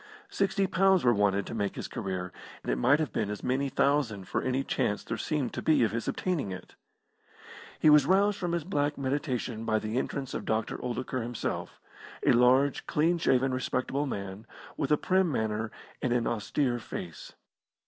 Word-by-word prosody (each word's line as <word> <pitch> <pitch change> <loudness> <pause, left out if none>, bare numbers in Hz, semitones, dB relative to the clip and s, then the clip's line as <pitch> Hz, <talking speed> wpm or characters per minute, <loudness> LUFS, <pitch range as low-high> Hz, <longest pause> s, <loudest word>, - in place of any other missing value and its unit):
Sixty 195 0 +1
pounds 190 0 +3
were 120 -1 +5
wanted 100 -2 +2
to - - -7
make 100 -3 -2
his - - -5
career, 95 -5 -4 0.3
and - - -1
it - - 0
might 140 - +4
have 150 -9 -2
been - - -1
as 105 - -5
many 135 +2 0
thousand 130 -9 +1
for - - -1
any 130 +1 0
chance 105 -5 -1
there - - -3
seemed 150 -6 -2
to - - -4
be 155 -5 +4
of 110 - +2
his 115 +1 -3
obtaining 170 - -1
it. 95 -1 -8 1.1
He - - +3
was 150 -1 +6
roused 200 +2 +3
from 175 -2 -2
his 170 -2 0
black 145 -4 -1
meditation 130 -4 -2
by 110 -1 +1
the 110 +3 -1
entrance 135 -1 -4
of - - -3
Dr. 110 0 -1
Oldacre 125 +1 -3
himself, 120 0 -4 0.5
a - - +6
large, 130 +3 +4
clean 170 +3 +2
shaven, 130 -4 +2
respectable 130 +2 -1
man, 100 -1 -6 0.3
with 140 -1 -2
a 150 - +5
prim 185 0 +2
manner 110 -3 -1 0.3
and 125 - 0
an 120 -2 +1
austere 120 +3 0
face. 90 -6 -8
130 Hz, 185 wpm, -29 LUFS, 110-150 Hz, 1.1 s, was